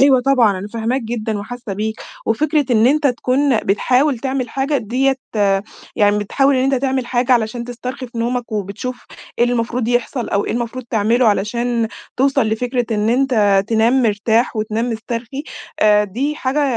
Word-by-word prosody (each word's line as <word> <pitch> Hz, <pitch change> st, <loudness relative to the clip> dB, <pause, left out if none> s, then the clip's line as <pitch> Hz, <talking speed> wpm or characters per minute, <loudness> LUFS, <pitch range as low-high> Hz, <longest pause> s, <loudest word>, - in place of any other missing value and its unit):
أيوه 270 Hz, -2 st, +6 dB
طبعًا 245 Hz, -7 st, +3 dB
أنا 200 Hz, +3 st, -6 dB
فاهماك 230 Hz, +3 st, -2 dB
جدًا 220 Hz, -2 st, -3 dB
وحاسة 225 Hz, +1 st, -6 dB
بيك، 215 Hz, +3 st, -3 dB, 0.3 s
وفكرة 295 Hz, +6 st, +1 dB
إن 225 Hz, 0 st, +4 dB
أنت 290 Hz, +2 st, +3 dB
تكون 255 Hz, +1 st, +1 dB
بتحاول 250 Hz, +7 st, +1 dB
تعمل 260 Hz, -1 st, -2 dB
حاجة 275 Hz, +4 st, -1 dB
دِيَّة 260 Hz, +5 st, 0 dB, 0.8 s
يعني 205 Hz, 0 st, +3 dB
بتحاول 270 Hz, +6 st, +2 dB
إن 255 Hz, -, +1 dB
أنت 270 Hz, 0 st, +2 dB
تعمل 260 Hz, -1 st, -1 dB
حاجة 250 Hz, +1 st, +1 dB
علشان 235 Hz, 0 st, 0 dB
تسترخي 250 Hz, +2 st, -6 dB
في 235 Hz, -1 st, -9 dB
نومك، 240 Hz, 0 st, -2 dB
وبتشوف 210 Hz, +5 st, -4 dB, 0.3 s
إيه 240 Hz, -, +5 dB
اللي 245 Hz, -, 0 dB
المفروض 235 Hz, 0 st, -1 dB
يحصل، 245 Hz, +1 st, -1 dB
أو 200 Hz, -, 0 dB
إيه -, -, -2 dB
المفروض 240 Hz, +1 st, -4 dB
تعمله 230 Hz, +3 st, +2 dB
علشان 230 Hz, +3 st, 0 dB, 0.3 s
توصل 275 Hz, +1 st, +2 dB
لفكرة 245 Hz, +2 st, -1 dB
إن 210 Hz, +1 st, 0 dB
أنت 225 Hz, -6 st, +3 dB
تنام 230 Hz, +3 st, +3 dB
مرتاح 220 Hz, +2 st, +1 dB
وتنام 220 Hz, +3 st, -1 dB
مسترخي، 230 Hz, +4 st, -5 dB, 0.4 s
آآ 210 Hz, 0 st, +5 dB
دي 260 Hz, +10 st, -2 dB
حاجة 290 Hz, 0 st, 0 dB
240 Hz, 165 wpm, -18 LUFS, 220-260 Hz, 0.8 s, أيوه